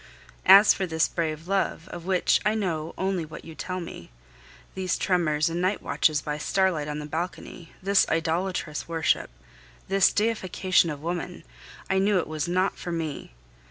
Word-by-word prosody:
As 200 +2 +9
for 190 - -2
this 160 -1 +1
brave 160 -1 -3
love, 190 -3 -1
of 170 - -8
which 185 -1 +2
I 215 +2 +2
know 165 -7 -2
only 190 -2 -1
what 155 0 -10
you 160 - -9
tell 185 +3 -4
me, 170 - -9 0.6
these 185 -1 -1
tremors 165 -4 +1
and 170 +1 -2
night 185 +3 +1
watches 150 +1 +1
by 150 0 -3
starlight 180 -3 +1
on 150 0 -3
the 150 - -5
balcony, 165 +1 -6
this 200 0 +3
idolatrous 165 -1 -1
worship, 165 -1 0 0.6
this 195 -1 +4
deification 190 -5 +1
of 150 -1 -6
woman 175 +1 -4 0.4
I 190 - +1
knew 200 +1 +3
it 175 - 0
was 155 +1 -3
not 185 +2 0
for 175 - -5
me. 160 - -4
175 Hz, 165 wpm, -26 LUFS, 160-190 Hz, 0.6 s, As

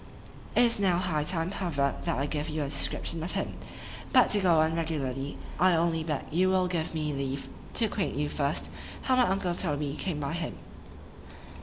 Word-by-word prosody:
It 245 - +7
is 235 -3 +2
now 185 -3 +3
high 170 -5 0
time, 165 +2 -1
however, 145 -8 0
that - - 0
I 140 - 0
give 150 0 -2
you 155 -1 -1
a 140 - -3
description 155 +3 0
of 170 - -4
him:—But 255 -2 0
to 210 - +5
go 175 -5 +4
on 160 +1 +2
regularly, 145 -4 -2 0.2
I 185 -1 +5
only 165 -1 +1
beg 150 -3 -2
you 185 +4 +3
will 185 -1 +3
give 165 -2 -2
me 150 -1 -1
leave 135 0 -3 0.3
to 230 - +4
acquaint 210 -2 -2
you 145 +1 0
first, 145 0 -1 0.3
how 260 - +3
my 250 -1 +4
uncle 190 -2 0
Toby 150 -5 -1
came 165 -2 -2
by 140 +2 -2
him. 170 -2 -4
165 Hz, 190 wpm, -29 LUFS, 145-185 Hz, 0.3 s, It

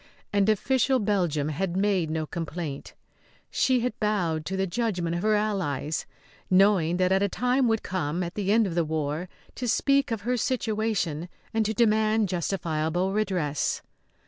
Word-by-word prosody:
And 200 0 +3
official 260 +5 +2
Belgium 180 - 0
had 175 +3 -2
made 190 -5 +1
no 155 0 -1
complaint. 160 -3 -5 0.6
She 255 -2 +2
had 250 +1 -2
bowed 175 -8 0
to 190 - -2
the 190 - +1
judgment 185 -5 -1
of 175 - -2
her 215 +1 +3
allies, 180 -9 -1 0.4
knowing 185 -3 +4
that 185 0 +2
a 200 - +2
time 250 +4 +1
would 225 -1 +1
come, 175 -1 -2
at 175 0 -5
the 200 -1 -1
end 225 +1 +4
of 185 - -3
the 170 0 +2
war, 155 +2 -2 0.2
to 250 - -4
speak 275 +4 +2
of 225 -3 -2
her 245 +4 0
situation 215 - -1 0.2
and 225 0 +2
to 220 - -1
demand 215 -2 +3
justifiable 175 0 -1
redress. 185 -9 -1
190 Hz, 160 wpm, -26 LUFS, 165-215 Hz, 0.6 s, knowing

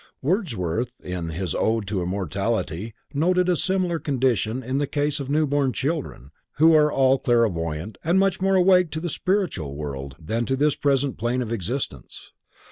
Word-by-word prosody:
Wordsworth 125 - -1
in 90 -2 -4
his 85 0 -3
Ode 110 -1 0
to 100 -3 -1
Immortality 100 +3 -2 0.2
noted 180 +5 +2
a 180 - +3
similar 180 -1 0
condition 130 -4 0
in 130 +3 -1
the 145 - 0
case 145 +1 -1
of 140 -1 -5
new 155 +2 +2
born 140 -2 +1
children, 140 - -3 0.3
who 160 +3 +6
are 150 -1 +5
all 135 -1 +3
clairvoyant 95 -6 0
and 170 +4 +2
much 195 -1 +2
more 195 0 +3
awake 180 -1 +5
to 155 - -2
the 175 +2 -3
spiritual 165 - -1
world 70 -2 -6
than 115 +8 -2
to 135 - +1
this 145 +2 +2
present 140 -1 0
plane 120 +3 0
of 115 - -6
existence. 110 - -5
130 Hz, 170 wpm, -24 LUFS, 95-155 Hz, 0.3 s, who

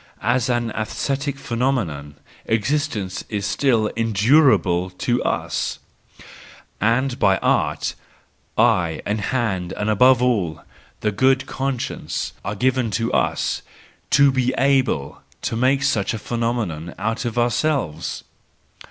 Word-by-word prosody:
As 125 +3 +1
an 120 -2 0
aesthetic 135 +6 -2
phenomenon 115 - -2 0.3
existence 110 -4 -1
is 105 -2 -2
still 115 0 +2
endurable 110 - +3
to 120 +7 -1
us; - - -1 1.0
and 125 +4 +1
by 95 0 +4
Art, - - 0 0.6
eye 85 -3 +2
and 105 +1 -1
hand 100 -7 -1
and 105 +1 -1
above 125 +4 +5
all 100 -11 0 0.4
the 105 - +1
good 130 +6 +2
conscience 135 -2 -3
are 100 - -3
given 125 +1 +1
to 115 +2 -1
us, - - 0 0.5
to 140 -1 +5
be 130 -1 +1
able 130 - +1 0.2
to - - -1
make 130 +4 +2
such 115 -6 +1
a - - -3
phenomenon 110 -9 -3
out 115 +2 -2
of 120 -1 -4
ourselves. 120 - 0
115 Hz, 115 wpm, -21 LUFS, 100-130 Hz, 1.0 s, above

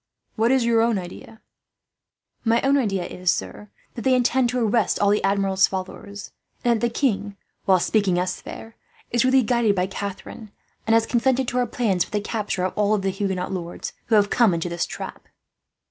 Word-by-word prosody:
What 225 +2 +2
is 260 -2 +3
your 230 -1 +3
own 230 -2 +2
idea?" 185 +4 -9 1.0
"My 230 0 +3
own 275 +1 +3
idea 200 -9 0
is, 180 0 -3
sir, 210 +2 -2 0.2
that 235 - -6
they 260 +2 +3
intend 250 0 +2
to 250 +1 -1
arrest 225 +1 +1
all 200 0 +3
the 210 - +1
Admiral's 195 -1 +2
followers; 195 +1 -7 0.3
and 235 -2 +2
that 240 - +2
the - - -6
king, 210 -6 -1 0.3
while 190 -1 +4
speaking 195 -1 +1
us 180 +1 -2
fair, 225 0 -10 0.4
is 240 -1 +2
really 260 0 +4
guided 230 -3 +2
by 180 -1 +1
Catharine, 200 +3 -7 0.4
and 225 - +4
has 225 0 +3
consented 255 +2 +1
to 250 - -3
her 245 -1 +1
plans 210 -7 0
for - - -13
the 210 - -1
capture 205 -3 -3
of 185 - -2
all 210 0 +2
the 195 -1 -1
Huguenot 190 -2 -2
lords 175 -2 -5
who 225 - +3
have 205 -1 +3
come 225 -8 +4
into 170 +1 -3
this 170 0 -2
trap." - - -8
210 Hz, 195 wpm, -23 LUFS, 195-235 Hz, 1.0 s, while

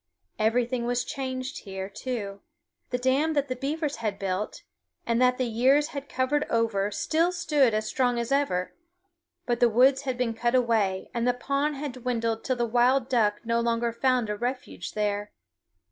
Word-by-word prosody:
Everything 235 +2 +1
was 245 0 0
changed 260 -1 -4
here, 190 -2 -6
too. 205 -2 -5 0.5
The 250 - 0
dam 265 +5 +2
that 285 -2 0
the 255 - -1
beavers 290 +3 -2
had 215 -3 -2
built, 195 +1 -3 0.4
and 235 +1 +1
that 250 0 +4
the 255 - 0
years 260 +6 +3
had 280 -2 -7
covered 265 +3 +1
over, 225 -4 +1
still 325 - +1
stood 300 -10 +2
as 215 0 0
strong 245 +1 +1
as 235 +2 -2
ever; 230 -11 +1 0.7
but 240 -1 0
the 240 - +5
woods 260 +4 +4
had 260 -3 -3
been 245 -2 0
cut 240 +2 0
away, 220 -6 +1
and 235 0 0
the 245 - +2
pond 280 +4 -1
had 285 0 -4
dwindled 230 -3 -2
till 260 - 0
the 240 -1 0
wild 245 +3 +2
duck 210 -4 +2
no 230 0 +1
longer 235 0 0
found 250 -1 +1
a - - -1
refuge 245 -5 -4
there. 205 -1 -2
245 Hz, 175 wpm, -27 LUFS, 225-265 Hz, 0.7 s, the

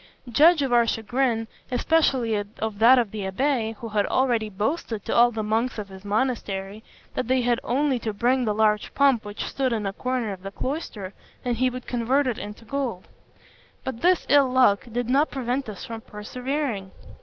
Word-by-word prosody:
Judge 305 +5 +6
of 260 -3 0
our 235 -1 +5
chagrin, 225 +1 0 0.2
especially 255 -3 +2
of 210 0 -3
that 240 +4 +7
of 235 -5 +1
the 215 - -6
abbé, 225 +3 0
who 230 +2 -7
had 210 -1 +1
already 240 -5 +1
boasted 215 - -3
to - - -2
all 240 +1 +6
the 220 -2 -4
monks 225 +4 0
of 205 -2 -5
his 190 0 -12
monastery, 205 -2 -2 0.3
that 255 - -2
they 260 0 +2
had 240 -1 +1
only 265 0 +1
to 220 -1 -3
bring 245 +5 +1
the 215 -3 0
large 215 -1 +2
pump 275 -5 +4
which 205 0 -5
stood 265 -2 -1
in 220 -3 -1
a 195 - -2
corner 250 -3 -2
of 185 - -10
the 195 - -6
cloister, 210 - -5 0.3
and 240 -2 0
he 255 +2 +2
would 250 0 -7
convert 250 +4 +1
it 250 -4 -1
into 210 +2 -8
gold: 245 -6 -3 0.8
but 250 -3 -5
this 360 0 +3
ill 280 -2 +5
luck 225 -7 +4
did 240 +1 -2
not 280 +5 +3
prevent 260 -1 -2
us 205 - -7
from 225 -1 -7
persevering. 240 0 -4
235 Hz, 190 wpm, -25 LUFS, 210-260 Hz, 0.8 s, that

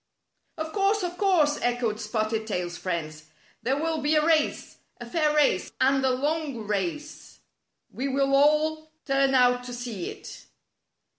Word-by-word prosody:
"Of 315 0 -5
course! 400 0 +1
Of 355 0 -3
course!" 320 -7 +3
echoed 240 -3 -1
Spotted 215 0 -2
Tail's 180 -4 -3
friends. 155 -5 -4 0.4
"There 265 +3 0
will 320 0 -1
be 295 +2 +2
a 305 0 +3
race 320 -2 +1
— - - -46
a 240 - -7
fair 300 +4 0
race 285 -11 +2
— - - -47
and 270 +1 +3
a 265 - +3
long 280 -2 -2
race. 205 - -4 0.5
We 265 +3 -3
will 275 0 +1
all 310 +2 +2
turn 275 -1 +2
out 250 -1 +4
to 250 - -7
see 235 -7 -5
it." - - -11
275 Hz, 160 wpm, -26 LUFS, 230-310 Hz, 0.5 s, out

